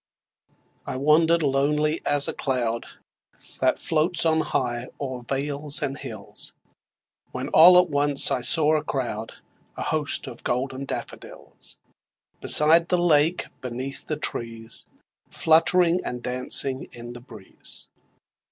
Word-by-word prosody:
I - - -4
wander'd 160 +4 +2
lonely 150 +3 0
as 145 -1 +4
a - - -3
cloud 120 -4 -3 0.7
That - - +1
floats 165 +3 +2
on 160 -1 +2
high 120 -4 -3
o'er 130 -3 -5
vales 140 +3 0
and 135 - -3
hills, - - -7 0.8
When - - -6
all 180 +3 +7
at 180 0 +4
once 145 -1 +3
I 125 - -1
saw 155 +4 +4
a 155 - -1
crowd, 115 -5 -5 0.4
A - - -4
host 155 -2 -1
of 120 - -10
golden 130 +2 -3
daffodils, - - -10 0.6
Beside 165 +3 +4
the 180 - +1
lake, 165 0 +2 0.2
beneath 130 +2 -5
the 155 - -3
trees, 115 -5 -6 0.4
Fluttering 170 +2 +2
and 125 -1 -6
dancing 130 +1 +1
in 120 0 -9
the 120 - -11
breeze. 110 -6 -10
140 Hz, 125 wpm, -23 LUFS, 125-155 Hz, 0.8 s, all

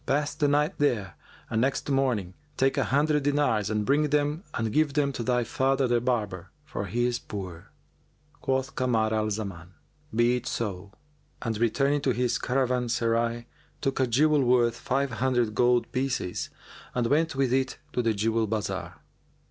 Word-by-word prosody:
Pass 145 +2 +1
the 145 - +1
night 150 +5 +1
there, 115 -11 +1 0.3
and 110 - 0
next 135 +2 0
morning, 125 -10 0 0.2
take 135 0 +2
an 135 - +1
hundred 150 +2 +2
dinars 140 -8 +1
and 105 -1 0
bring 150 +4 +2
them 150 +4 0
and 115 -2 -1
give 150 -2 +2
them 145 -2 +2
to 125 - -4
thy 125 0 +1
father 135 +2 +1
the 120 -1 +2
barber, 105 -8 -2 0.2
for - - -4
he 120 +1 0
is 120 0 0
poor." 90 -5 -7 0.7
Quoth 135 +1 -1
Kamar 110 -4 +1
al 110 0 +1
Zaman, 95 -4 -5 0.4
"Be 120 +2 +3
it 125 - -7
so," 100 -3 -3 0.5
and 115 -2 -1
returning 140 +5 +2
to 130 -2 +1
his 125 -1 0
caravanserai, 120 -2 0 0.3
took 135 0 -1
a 130 - +3
jewel 150 +5 +3
worth 120 -2 +3
five 135 +3 -1
hundred 120 -2 +1
gold 120 +2 +2
pieces 130 -8 -2 0.5
and 125 -1 +1
went 155 +5 +2
with 135 -2 +1
it 130 0 0 0.2
to 125 - +1
the 115 -2 +1
jewel 110 +2 +1
bazar. 110 0 -3
125 Hz, 165 wpm, -27 LUFS, 115-135 Hz, 0.7 s, Be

